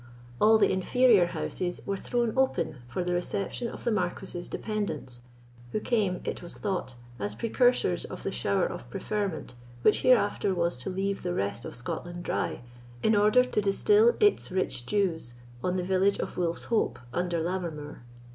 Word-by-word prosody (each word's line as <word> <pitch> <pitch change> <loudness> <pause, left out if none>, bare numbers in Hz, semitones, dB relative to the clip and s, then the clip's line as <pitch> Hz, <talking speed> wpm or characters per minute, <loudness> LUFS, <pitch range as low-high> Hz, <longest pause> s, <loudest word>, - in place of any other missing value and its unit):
All 220 +1 +6
the 220 - +4
inferior 200 0 +4
houses 175 0 -3
were 200 - -1
thrown 235 +2 -1
open 265 - +1
for 120 +9 -2
the 180 0 -1
reception 195 +6 -2
of - - -8
the 235 - +1
Marquis's 180 -2 -2
dependants, 155 - -4 0.5
who - - +1
came, 210 -5 0
it - - -4
was 175 - -7
thought, 185 - -3 0.2
as 105 0 -2
precursors 240 - +2
of - - -8
the - - -2
shower 60 - +1
of - - -6
preferment 200 - -3 0.3
which 215 - +4
hereafter 205 -6 +3
was 170 0 +1
to 125 - -4
leave 195 +1 -2
the 180 0 -2
rest 100 +4 -2
of - - -6
Scotland 175 +8 -5
dry, - - -2 0.4
in 220 - +4
order 210 +5 +5
to 250 -4 0
distil 420 - +4
its 415 - +3
rich 180 -10 -1
dews 165 - 0 0.3
on 180 0 0
the 180 - -1
village 190 +2 +2
of - - -4
Wolf's 170 -2 -1
Hope 230 -2 0 0.2
under 175 -1 0
Lammermoor. 160 -5 -4
185 Hz, 165 wpm, -28 LUFS, 170-215 Hz, 0.5 s, All